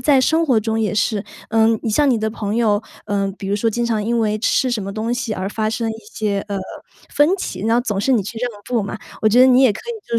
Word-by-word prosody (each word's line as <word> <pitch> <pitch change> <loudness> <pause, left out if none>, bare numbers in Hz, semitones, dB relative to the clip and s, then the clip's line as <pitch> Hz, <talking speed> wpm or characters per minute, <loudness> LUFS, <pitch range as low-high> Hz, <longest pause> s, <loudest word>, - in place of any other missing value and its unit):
在 270 0 +4
生 320 +5 +2
活 255 -7 +3
中 220 +1 -1
也 210 -4 0
是， 205 0 0 0.3
呃， 225 0 +4 0.2
你 - - -2
像 280 +5 +3
你 235 - +2
的 220 - -1
朋 215 0 -3
友， 215 -2 +2 0.2
呃， 200 -1 -1
比 195 - -6
如 200 - 0
说 225 +2 +1
经 240 +2 -1
常 220 -2 0
因 235 +1 0
为 215 -1 +1
吃 255 +3 +1
什 230 -5 -1
么 195 +1 -5
东 225 +3 -2
西 245 -3 -3
而 190 -1 -3
发 215 +1 -1
生 225 0 -2
一 220 - -3 0.2
些， 205 -2 -1
呃， 200 -1 -2 0.6
分 290 +1 +5
歧， 185 - -5
然 225 +3 +2
后 245 - +3
总 210 -6 -2
是 265 - 0
你 240 -5 +4
去 215 +4 -7
让 245 +1 -2 0.2
步 235 -4 +1
嘛， 200 +2 -5 0.2
我 215 - +5
觉 225 +3 +3
得 255 - +8
你 255 0 +5
也 245 -5 +5
可 - - -8
以 445 - -9
就 230 -1 +1
225 Hz, 300 characters per minute, -20 LUFS, 210-245 Hz, 0.6 s, 得